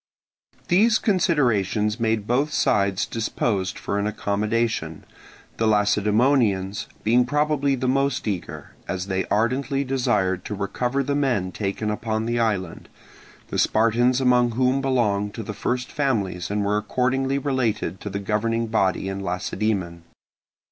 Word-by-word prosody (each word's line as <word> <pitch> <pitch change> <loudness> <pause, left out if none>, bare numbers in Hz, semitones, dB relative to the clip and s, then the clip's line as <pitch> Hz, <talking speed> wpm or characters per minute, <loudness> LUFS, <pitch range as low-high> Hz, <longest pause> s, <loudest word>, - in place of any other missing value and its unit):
These 215 +5 +4
considerations 120 - +1
made 110 -2 0
both 135 +7 +1
sides 100 -6 +1
disposed 105 -4 -2
for 100 - -2
an 100 - 0
accommodation; 105 -5 -1 0.5
the 110 - +1
Lacedaemonians 105 -1 +2 0.2
being 120 +3 +4
probably 145 +1 +1
the 130 0 -2
most 135 -1 0
eager, 100 -4 -5 0.2
as 95 0 -3
they 95 -1 -1
ardently 130 +6 0
desired 105 -9 0
to 105 - -4
recover 125 +7 -1
the 140 +2 -1
men 125 -10 0
taken 105 +2 -2
upon 110 +1 -2
the 120 +1 -1
island, 100 -7 -2 0.6
the - - -2
Spartans 120 +3 +3
among 125 -2 +3
whom 130 +3 +2
belonged 105 -6 0
to 115 - -5
the 105 - -6
first 125 +4 -2
families 105 - -1
and 105 0 -1
were 105 +1 +1
accordingly 130 +5 0
related 120 - -1
to 105 - -5
the 100 - -4
governing 110 +3 -1
body 95 -4 0
in 95 0 -3
Lacedaemon. 90 -1 -2
110 Hz, 135 wpm, -23 LUFS, 100-130 Hz, 0.6 s, These